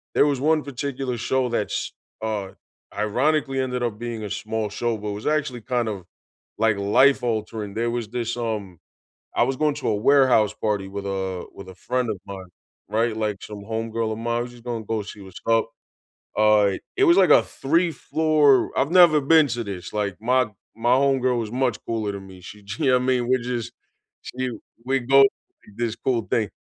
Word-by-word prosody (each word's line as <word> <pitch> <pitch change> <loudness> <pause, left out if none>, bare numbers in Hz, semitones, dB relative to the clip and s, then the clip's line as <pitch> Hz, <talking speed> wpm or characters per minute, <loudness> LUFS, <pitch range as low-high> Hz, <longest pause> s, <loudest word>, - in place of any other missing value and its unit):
there - - +5
was 140 -3 0
one 155 +1 +2
particular 135 -2 -4
show 130 +2 0
that's, 115 -3 -2 0.3
uh, 105 -3 -3 0.4
ironically 135 +6 +1
ended 125 -1 -1
up 110 -3 -2
being 120 -2 -5
a 105 - -5
small 110 +1 -3
show, 115 +1 -1
but 105 0 -5
it - - -3
was 105 +2 -6
actually 150 -5 0
kind 120 0 -1
of, 95 -4 -6 0.5
like, 110 -1 +2
life 130 +8 +4
altering, 110 -3 -3
there 115 +1 0
was 120 -2 -3
this, 120 0 -3
um 105 -7 -4 0.6
I - - +2
was 130 +2 0
going 150 +1 +2
to - - -4
a 110 - +1
warehouse 120 -2 +4
party 105 -3 -2
with 100 +1 -6
a 95 -2 -3
with 100 - -10
a 95 - -11
friend 125 +5 -2
of 100 - -6
mine, 95 -2 -8 0.4
right? 115 +1 +1
Like, 105 -2 -1
some 105 -1 -8
homegirl 115 +1 -2
of - - -6
mine, 120 +1 -1
I - - 0
was 120 0 -6
just 120 -1 -16
gonna 120 -3 -4
go 110 0 -1
see 100 +1 -10
what’s 95 -2 -11
up, 115 0 +3 0.7
uh, 105 -2 +4 0.2
it 390 - +4
was 340 -3 +6
like 185 -4 +5
a - - +7
3 165 +6 0
floor 155 -4 +3
I've 140 +3 +1
never 170 -4 +7
been 155 +2 +5
to 120 -1 -3
this, 95 -4 -7
like, 100 -3 -1
my 125 +2 +2 0.3
my 120 +2 +3
homegirl 130 -3 +2
was 110 -2 -4
much 125 -2 0
cooler 110 -3 -2
than 100 -1 -8
me, 95 -1 -13
she 105 +4 -11 0.2
You 145 -4 +2
know 125 - +5
I - - +4
mean? 125 -1 +1
We're 130 -2 +1
just 120 0 -4 0.5
She 130 +1 -4
w 120 - -7 0.2
We 135 +1 +1
go 135 +3 +5
to - - +6 0.5
this 120 -1 -2
cool 120 -3 0
thing. 110 -3 +2
115 Hz, 205 wpm, -23 LUFS, 105-130 Hz, 0.7 s, a